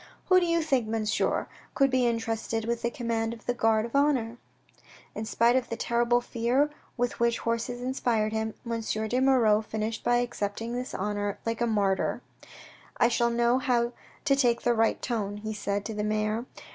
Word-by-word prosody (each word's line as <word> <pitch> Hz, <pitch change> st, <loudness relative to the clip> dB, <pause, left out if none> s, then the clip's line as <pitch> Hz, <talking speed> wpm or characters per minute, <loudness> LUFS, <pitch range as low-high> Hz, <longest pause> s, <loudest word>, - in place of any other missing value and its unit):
Who 370 Hz, 0 st, +7 dB
do 350 Hz, -, 0 dB
you 335 Hz, -1 st, +2 dB
think, 265 Hz, -7 st, +1 dB
monsieur, 220 Hz, -1 st, 0 dB, 0.3 s
could 275 Hz, -1 st, +3 dB
be 255 Hz, -1 st, +3 dB
entrusted 225 Hz, -1 st, -2 dB
with 235 Hz, 0 st, -1 dB
the 235 Hz, -, 0 dB
command 230 Hz, -1 st, -2 dB
of 225 Hz, -, -18 dB
the 245 Hz, -, 0 dB
guard 225 Hz, -2 st, +2 dB
of 235 Hz, -, -7 dB
honour? 260 Hz, -5 st, +2 dB, 0.8 s
In 215 Hz, -, -4 dB
spite 235 Hz, +2 st, +3 dB
of 255 Hz, -2 st, 0 dB
the 230 Hz, -, -2 dB
terrible 240 Hz, +1 st, +2 dB
fear 245 Hz, +6 st, +1 dB, 0.3 s
with 245 Hz, 0 st, -1 dB
which 235 Hz, 0 st, +2 dB
horses 230 Hz, +1 st, -2 dB
inspired 235 Hz, -4 st, 0 dB
him, 220 Hz, 0 st, -2 dB
M. 235 Hz, -, -5 dB
de 220 Hz, +3 st, -1 dB
Moirod 230 Hz, -5 st, +4 dB
finished 220 Hz, +1 st, -3 dB
by 240 Hz, -, +3 dB
accepting 230 Hz, -1 st, -2 dB
this 250 Hz, +1 st, -4 dB
honour 205 Hz, 0 st, -2 dB
like 230 Hz, 0 st, -2 dB
a 235 Hz, -, +2 dB
martyr. 200 Hz, -4 st, 0 dB, 0.4 s
" -, -, -15 dB, 0.3 s
I 235 Hz, -, +4 dB
shall 235 Hz, 0 st, +2 dB
know 235 Hz, +1 st, +2 dB
how 240 Hz, -2 st, +1 dB, 0.3 s
to 275 Hz, -, +4 dB
take 240 Hz, -4 st, +2 dB
the 240 Hz, -, +3 dB
right 225 Hz, -1 st, +2 dB
tone," 205 Hz, -4 st, -2 dB
he 215 Hz, +1 st, -5 dB
said 200 Hz, -1 st, -2 dB
to 220 Hz, -, -4 dB
the 210 Hz, 0 st, -2 dB
mayor. 215 Hz, +3 st, -1 dB
235 Hz, 190 wpm, -28 LUFS, 220-245 Hz, 0.8 s, Who